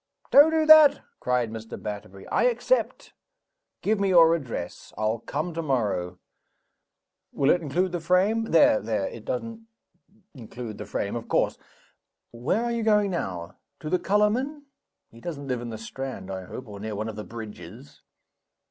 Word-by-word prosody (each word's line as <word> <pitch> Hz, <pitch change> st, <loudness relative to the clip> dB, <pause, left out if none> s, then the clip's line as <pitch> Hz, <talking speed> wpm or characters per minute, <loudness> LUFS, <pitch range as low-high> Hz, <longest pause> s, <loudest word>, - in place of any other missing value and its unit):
"Don't 290 Hz, +3 st, +8 dB
do 320 Hz, -1 st, +2 dB
that!" 310 Hz, -2 st, +8 dB, 0.2 s
cried 125 Hz, -3 st, 0 dB
Mr. 115 Hz, 0 st, -8 dB
Batterbury. 100 Hz, -2 st, -7 dB
"I -, -, +2 dB
accept. -, -, 0 dB, 0.7 s
Give 215 Hz, 0 st, +1 dB
me 200 Hz, -1 st, +1 dB
your 165 Hz, -3 st, +7 dB
address. 125 Hz, -, -5 dB
I'll 110 Hz, +1 st, 0 dB
come 155 Hz, +9 st, -4 dB
tomorrow. 110 Hz, -, -1 dB, 1.1 s
Will 140 Hz, -, +2 dB
it 175 Hz, -, +2 dB
include 170 Hz, +5 st, 0 dB
the 175 Hz, -, -2 dB
frame! 185 Hz, +7 st, +2 dB
There! 165 Hz, -, +5 dB
there! 105 Hz, -2 st, -1 dB
it 115 Hz, -, -9 dB
doesn't 225 Hz, -, -5 dB, 0.7 s
include 120 Hz, -3 st, -8 dB
the 105 Hz, -, -7 dB
frame, 100 Hz, +1 st, -3 dB
of 115 Hz, -1 st, -5 dB
course. -, -, +1 dB, 0.7 s
Where 130 Hz, -, -1 dB
are 240 Hz, -, -1 dB
you 235 Hz, -1 st, -1 dB
going 210 Hz, -2 st, +3 dB
now? 90 Hz, -, -4 dB, 0.2 s
To 155 Hz, -, -5 dB
the 180 Hz, -, +2 dB
colorman? 245 Hz, +9 st, 0 dB, 0.5 s
He 115 Hz, -, -15 dB
doesn't 145 Hz, -3 st, -6 dB
live 125 Hz, -2 st, -2 dB
in 120 Hz, -, -6 dB
the 110 Hz, -, -6 dB
Strand, 110 Hz, -3 st, -7 dB
I 95 Hz, -1 st, -5 dB
hope 125 Hz, +6 st, -8 dB
or 100 Hz, -1 st, -9 dB
near 110 Hz, +1 st, -5 dB
one 110 Hz, +2 st, -3 dB
of 110 Hz, -, -6 dB
the 105 Hz, -, -6 dB
bridges. 110 Hz, -, -10 dB
135 Hz, 165 wpm, -26 LUFS, -, 1.1 s, Don't